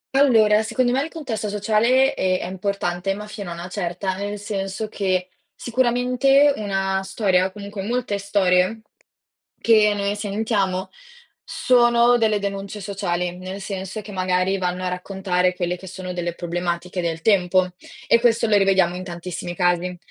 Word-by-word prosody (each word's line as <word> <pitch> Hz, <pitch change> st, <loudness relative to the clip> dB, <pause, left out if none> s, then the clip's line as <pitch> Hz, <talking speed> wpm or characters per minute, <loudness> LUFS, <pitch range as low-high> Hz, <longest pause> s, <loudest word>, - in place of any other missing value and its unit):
Allora, 220 Hz, -6 st, +5 dB
secondo 245 Hz, +3 st, 0 dB
me 265 Hz, +2 st, +1 dB
il 320 Hz, -, -3 dB
contesto 230 Hz, -10 st, -4 dB
sociale, 230 Hz, +6 st, +2 dB
ehm, 185 Hz, -6 st, +1 dB
è -, -, -5 dB
importante, 190 Hz, 0 st, -2 dB
ma 210 Hz, +1 st, -7 dB
fino 210 Hz, -3 st, -7 dB
a -, -, -4 dB
una 170 Hz, +1 st, -7 dB
certa, 185 Hz, 0 st, -3 dB
nel 205 Hz, +1 st, -4 dB
senso 200 Hz, 0 st, -4 dB
che, 185 Hz, -3 st, -1 dB, 0.3 s
sicuramente 255 Hz, +3 st, +3 dB
una 195 Hz, -2 st, -1 dB
storia, 190 Hz, -1 st, +1 dB
comunque 200 Hz, -1 st, -7 dB
molte 230 Hz, -1 st, -2 dB
storie, 195 Hz, +1 st, +2 dB, 0.8 s
che 215 Hz, -2 st, +5 dB
noi 200 Hz, 0 st, -1 dB
sentiamo 200 Hz, -2 st, -1 dB, 0.5 s
sono 240 Hz, -1 st, +3 dB
delle 215 Hz, -3 st, +2 dB
denunce 200 Hz, +1 st, -5 dB
sociali, 180 Hz, -3 st, -2 dB
nel 185 Hz, +2 st, -7 dB
senso 195 Hz, +1 st, -5 dB
che 205 Hz, -, -10 dB
magari 185 Hz, +1 st, +1 dB
vanno 180 Hz, 0 st, -2 dB
a -, -, 0 dB
raccontare 180 Hz, 0 st, -1 dB
quelle 180 Hz, 0 st, -2 dB
che 190 Hz, +1 st, -11 dB
sono 185 Hz, 0 st, -6 dB
delle 175 Hz, -1 st, -3 dB
problematiche 175 Hz, +1 st, -3 dB
del 165 Hz, -1 st, -3 dB
tempo 185 Hz, -3 st, +3 dB, 0.4 s
e 230 Hz, -, +4 dB
questo 235 Hz, -1 st, +3 dB
lo 210 Hz, -1 st, +3 dB
rivediamo 190 Hz, -3 st, +3 dB
in 185 Hz, -, -5 dB
tantissimi 175 Hz, 0 st, -6 dB
casi. 180 Hz, 0 st, +1 dB
195 Hz, 150 wpm, -22 LUFS, 180-215 Hz, 0.8 s, Allora